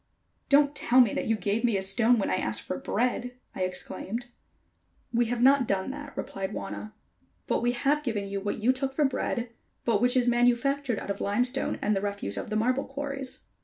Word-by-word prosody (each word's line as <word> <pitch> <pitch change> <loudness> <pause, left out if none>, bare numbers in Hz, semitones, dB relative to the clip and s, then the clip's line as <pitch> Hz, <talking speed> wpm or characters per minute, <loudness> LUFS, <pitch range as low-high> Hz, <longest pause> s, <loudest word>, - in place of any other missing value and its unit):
"Don't 285 0 +5
tell 255 -1 +4
me 240 -5 +6
that - - -2
you 225 - +3
gave 210 +3 -1
me 230 -5 +3
a - - -1
stone 225 +5 +3
when 200 - 0
I - - +2
asked 110 -8 -1
for 185 - -4
bread!" 245 +2 -1 0.2
I - - -6
exclaimed. 210 +5 -3 0.8
"We 240 +1 +3
have 240 +1 0
not 270 -2 +5
done 195 +5 0
that," 290 0 -9
replied 195 -1 -4
Wauna; 100 +2 -6 0.5
"but - - 0
we 240 +1 +2
have 280 +5 +1
given 220 -8 -2
you 195 0 -3
what 205 +1 -2
you 235 +4 +3
took 265 0 -3
for 300 - +3
bread, 250 -2 -1 0.4
but 225 -3 +2
which 250 +1 +3
is 245 -1 +3
manufactured 245 +1 +2
out - - -4
of 200 - -5
limestone 245 +6 0
and 210 - +2
the 195 - 0
refuse 200 - -2
of - - -4
the 215 - -2
marble 250 +5 +1
quarries." 275 -1 -5
240 Hz, 205 wpm, -28 LUFS, 200-260 Hz, 0.8 s, me